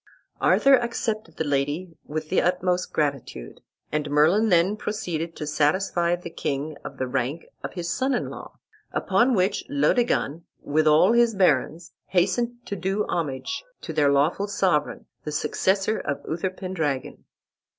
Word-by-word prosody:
Arthur 275 - +5
accepted 225 -2 -3
the - - 0
lady 145 +4 -1
with 155 +1 -4
the 190 - +3
utmost 180 0 0
gratitude, 140 - -3 0.3
and 150 -1 -1
Merlin 165 +10 +4
then 180 +3 +3
proceeded 175 -7 -4
to 150 - -5
satisfy 170 +3 +1
the 175 -1 -9
king 145 0 -3
of - - -8
the 130 - -1
rank 130 +5 -2 0.2
of - - -5
his 175 -2 -4
son 260 +9 0
in - - -2
law; - - -10 0.3
upon 245 +1 +2
which 195 +1 +1
Laodegan, 240 - +1 0.2
with 155 +2 +1
all 155 +7 +6
his 235 -2 +4
barons, 165 -2 +1
hastened 235 +7 0
to 200 - -4
do 195 +2 -1
homage 155 - -2 0.2
to 160 - -6
their 145 -2 +3
lawful 150 +8 +2
sovereign, 190 -6 0 0.2
the 150 - -4
successor 195 +7 0
of 140 - -4
Uther 170 +4 -1
Pendragon. 165 -8 -3
175 Hz, 150 wpm, -25 LUFS, 150-200 Hz, 0.3 s, all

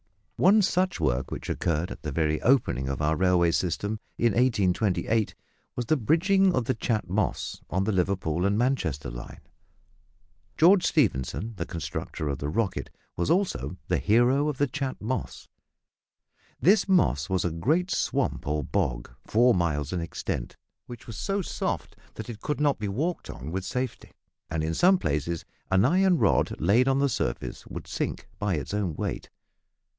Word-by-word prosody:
One 205 +4 +5
such 185 - +1
work, 65 -5 0
which - - -6
occurred 85 +2 -1
at - - -8
the 75 - -4
very 75 +1 0
opening 65 - +2
of 70 - -3
our 80 +1 +2
railway 90 -1 +3
system 100 +6 -1 0.2
in 115 -3 +2
1828, 110 -2 +1 0.4
was 120 - -2
the 155 - +3
bridging 185 - +3
of 125 - 0
the - - +1
Chat 110 -1 -1
Moss, 100 +4 -2
on 95 +2 0
the 110 - 0
Liverpool 90 -3 0
and 100 +2 +2
Manchester 80 - 0
line. - - -9 1.2
George 180 +3 +6
Stephenson, 110 - 0
the 85 - -3
constructer 80 -1 -4
of 70 -2 -2
the 70 - -3
"Rocket," 105 +2 -1 0.3
was 85 - -1
also 180 - 0
the - - +1
hero 125 +7 +3
of 145 - -3
the 145 - +3
Chat 135 -1 -4
Moss. 125 +5 -4 1.1
This 195 +3 +4
moss 75 - +3
was 95 -1 0
a 90 - 0
great 155 - 0
swamp - - -1
or 75 0 0
bog, - - -2 0.2
four 120 +3 +4
miles 75 -4 -1
in 90 - -1
extent, 80 -6 -4 0.3
which 120 0 -10
was 115 -4 -8
so 195 0 -1
soft - - -3 0.2
that - - -6
it 110 -2 -10
could 150 - -2
not 145 -4 +2
be 105 - -2
walked 155 - -2
on 70 +6 -7
with 95 +1 -3
safety, 125 +7 -4 0.4
and 80 -1 -2
in 80 +1 -1
some 185 - +5
places 75 - -2 0.2
an 95 +2 +4
iron 185 +4 +4
rod - - +2
laid 110 - +3
on 135 0 +3
the 140 0 +2
surface - - -3
would - - -7
sink - - -4
by 105 -3 0
its 75 +5 -4
own 100 -6 -1
weight. - - -4
105 Hz, 170 wpm, -27 LUFS, 80-135 Hz, 1.2 s, George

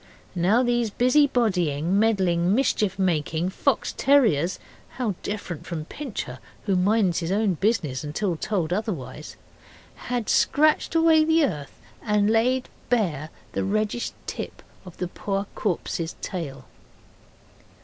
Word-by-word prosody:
Now 190 +8 +3
these 240 -2 +1
busy 255 +7 +4
bodying, 180 - +1
meddling, 190 -4 +2
mischief 210 -7 +1
making 170 -2 0
fox 250 +6 0
terriers 215 - +3 0.4
(how 240 -5 0
different 200 -6 -5
from 160 -3 -4
Pincher, 195 - -6 0.3
who 195 -3 +2
minds 190 -1 +2
his 170 0 -3
own 205 -1 +2
business 170 - 0
unless 150 0 -5 0.2
told 180 -6 -1
otherwise) 180 - -4 0.7
had 245 -3 -1
scratched 310 +2 +3
away 325 -1 +5
the 320 0 +4
earth 150 - -5 0.2
and 210 -1 +2
laid 250 +3 +2 0.2
bare 170 - 0 0.2
the - - -2
reddish 215 +4 -1
tip - - -6 0.2
of 180 - -11
the 180 - -2
poor 195 +2 -3
corpse's 170 -3 -2
tail. 140 -8 -5
200 Hz, 125 wpm, -25 LUFS, 170-235 Hz, 0.7 s, away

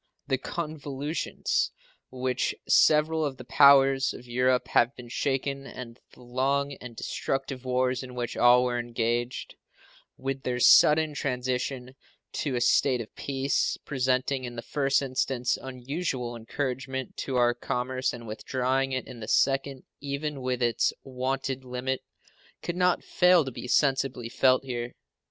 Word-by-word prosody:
The 135 -2 0
convulsions 150 -1 -2 0.4
with 130 - -10
which 130 -1 0
several 155 +1 +4
of 140 -3 -2
the - - -9
powers 135 0 +5
of 125 - -11
Europe 125 +1 +1
have 120 +3 +3
been 120 -1 -11
shaken 135 +2 -2
and 120 -1 -9
the 125 - -16
long 135 +3 0
and 125 -2 -9
destructive 135 +2 -3
wars 125 0 +1
in 125 -1 -9
which 120 -1 -3
all 125 +1 +6
were 120 -1 0
engaged, 120 +1 -2 0.6
with 135 0 -3
their 125 -1 -2
sudden 155 +4 +6
transition 130 -1 -2 0.4
to 140 -4 -2
a 120 - -1
state 125 +1 +3
of 110 -3 -8
peace, 140 0 -1
presenting 130 0 0
in 120 -1 -6
the 115 - -6
first 140 +2 +1
instance 130 -1 0
unusual 130 -1 -4
encouragement 130 +2 -4
to 135 - -3
our 120 -1 +4
commerce 125 +2 -2
and 120 -1 -9
withdrawing 130 +4 -1
it 130 - -2
in 120 - -10
the 110 - -7
second 135 -1 +1 0.2
even 140 0 -4
within 125 -1 +1
its 115 - +1
wonted 135 0 -3
limit, 125 +1 -3 0.6
could 175 - -3
not 180 0 +2
fail 180 -3 +4
to 135 - -4
be 125 - -7
sensibly 130 -2 +1
felt 130 +1 +3
here. 120 -2 -4
130 Hz, 145 wpm, -27 LUFS, 125-135 Hz, 0.6 s, all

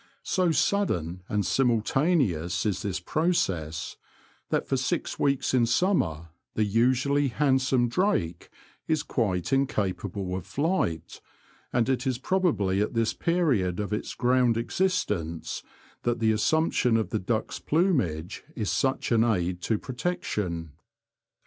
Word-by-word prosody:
So 185 -2 +1
sudden 90 - 0
and 105 -2 0
simultaneous 115 - +1
is 100 -3 0
this 95 -3 -2
process 90 - -1 0.5
that - - 0
for 135 - +1
six 130 0 -2
weeks 140 -2 +1
in 120 -2 +4
summer 95 - +1 0.3
the 110 - +2
usually 130 +7 +2
handsome 130 -2 +2
drake 115 - 0 0.4
is 155 -2 +1
quite 100 -2 -1
incapable 100 -7 -1
of 95 -2 -6
flight, 140 - -1 0.5
and 120 -2 +1
it 130 0 0
is 130 -2 0
probably 130 - +1
at 105 - -2
this 115 0 +1
period 135 - +1
of 105 0 -2
its 105 - -3
ground 125 -2 +3
existence 115 - -1 0.4
that 120 0 0
the 110 -1 +2
as 110 0 0
sumption 160 -7 +2
of 110 -5 -2
the 110 - 0
duck's 110 +3 -2
plumage 115 - 0
is 110 -4 -1
such 135 -1 0
an 115 -1 +4
aid 90 -6 0
to 110 - 0
protection. 105 - -3
115 Hz, 130 wpm, -27 LUFS, 95-140 Hz, 0.5 s, in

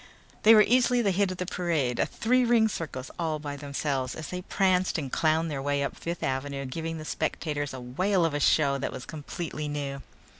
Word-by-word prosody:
They 225 +1 +8
were 215 - +8
easily 245 +1 +3
the 200 - +3
hit 195 +1 +2
of 185 - -5
the 180 - -2
parade, 165 -9 -1
a - - +2
three 250 +3 +2
ring 235 -2 +4
circus 150 -10 -5
all 160 -2 0
by 145 -1 -5
themselves, 140 -2 -2
as 155 - -6
they 180 0 -4
pranced 185 -1 +1
and 140 -5 -4
clowned 160 0 +2
their 135 -2 -3
way 140 0 0
up 140 - -3
Fifth 170 0 -5
Avenue 140 +1 -2
giving 165 +5 -4
the 155 - -7
spectators 150 -2 -2
a 130 - -6
whale 175 +9 +1
of 165 - 0
a 145 - 0
show 140 -2 +3
that 135 - -2
was 130 - -7
completely 155 0 -5
new. 140 -2 -4
155 Hz, 215 wpm, -28 LUFS, 140-180 Hz, -, They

